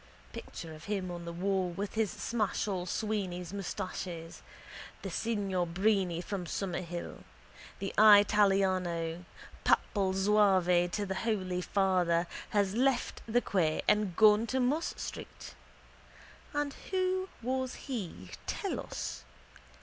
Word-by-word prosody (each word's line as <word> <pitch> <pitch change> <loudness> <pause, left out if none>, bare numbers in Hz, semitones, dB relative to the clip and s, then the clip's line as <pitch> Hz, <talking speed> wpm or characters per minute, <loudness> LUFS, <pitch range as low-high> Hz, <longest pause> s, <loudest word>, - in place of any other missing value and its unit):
Picture 165 -1 -8
of 155 -1 -11
him 195 -3 -2
on 175 -1 -6
the 170 - -4
wall 185 +1 0
with 195 +3 -4
his 220 -2 +1
Smashall 205 -4 -1
Sweeney's 185 -4 -2
moustaches, 180 -3 -5 0.6
the - - -4
signior 200 -5 0
Brini 185 -1 +1
from 190 -3 -4
Summerhill, 175 -1 -4 0.5
the 195 - -4
eyetallyano, 190 -5 +4 0.4
papal 195 -3 +2
Zouave 190 -3 +4
to 205 +3 -2
the 190 - -2
Holy 190 -6 -1
Father, 180 -3 +2 0.2
has 200 -2 +1
left 255 +2 +1
the 240 +2 +2
quay 165 -8 +1
and 210 -4 +2
gone 215 +1 +6
to 260 - 0
Moss 285 +7 0
street. - - -7 1.0
And 290 -1 -1 0.2
who 375 0 0
was 260 +1 -1
he, 180 - -5 0.2
tell - - -2
us? - - -5
195 Hz, 120 wpm, -31 LUFS, 180-215 Hz, 1.0 s, gone